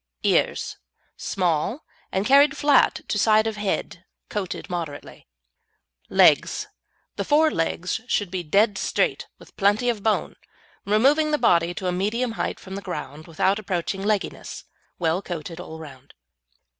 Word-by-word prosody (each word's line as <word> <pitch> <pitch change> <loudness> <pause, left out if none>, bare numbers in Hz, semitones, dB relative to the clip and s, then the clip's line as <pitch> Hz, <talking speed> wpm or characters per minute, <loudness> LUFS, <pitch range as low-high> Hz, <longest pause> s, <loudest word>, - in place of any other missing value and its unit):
EARS - - +1 0.4
Small, 185 - -1 0.3
and 190 +2 -1
carried 280 +3 +5
flat 290 -2 +3
to 210 - -1
side 215 +1 +4
of 220 -1 -2
head, 195 -3 -3 0.3
coated 195 -4 -4
moderately. 165 - -6 0.8
LEGS - - +4 0.5
The 200 - -1
fore 305 +7 +3
legs 175 - -2
should 205 -6 0
be 185 -1 -2
dead 200 +5 +2
straight, - - 0
with - - -18
plenty 205 +5 +2
of 225 -4 -1
bone, 215 +1 0 0.5
removing 275 +9 +3
the 300 - +2
body 170 - +2
to 190 - -5
a 180 - +1
medium 215 +7 -1
height 225 - -3
from 190 - -10
the 200 - -5
ground, 155 -4 -7
without 190 +5 +1
approaching 190 -1 -3
legginess; 205 0 -2 0.3
well 170 +1 0
coated 170 -2 -6
all 160 -3 -8
round. 140 -4 -12
195 Hz, 145 wpm, -24 LUFS, 175-220 Hz, 0.8 s, carried